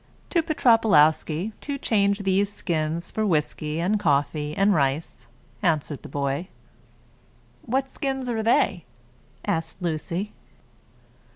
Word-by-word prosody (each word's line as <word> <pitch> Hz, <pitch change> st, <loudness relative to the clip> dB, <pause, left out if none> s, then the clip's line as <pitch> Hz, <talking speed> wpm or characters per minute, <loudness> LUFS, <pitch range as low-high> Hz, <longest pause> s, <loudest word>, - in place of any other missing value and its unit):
"To 340 Hz, -, +3 dB
Petropawlowsky, 205 Hz, -, +3 dB
to 285 Hz, -1 st, -3 dB
change 200 Hz, -5 st, +1 dB
these 195 Hz, +1 st, +2 dB
skins 165 Hz, -3 st, -2 dB
for 220 Hz, -, -1 dB
whisky 155 Hz, -3 st, 0 dB
and 195 Hz, +5 st, +1 dB
coffee, 150 Hz, -1 st, 0 dB
and 200 Hz, +1 st, +4 dB
rice," 140 Hz, -4 st, -1 dB, 0.3 s
answered 155 Hz, -6 st, 0 dB
the -, -, -10 dB
boy. 140 Hz, +4 st, -2 dB, 1.1 s
"What 265 Hz, +3 st, -1 dB
skins 270 Hz, -1 st, -3 dB
are 230 Hz, -2 st, -1 dB
they?" 215 Hz, -6 st, +2 dB, 0.6 s
asked 165 Hz, 0 st, -2 dB
Lucy. 175 Hz, +3 st, -3 dB
175 Hz, 110 wpm, -25 LUFS, 155-215 Hz, 1.1 s, and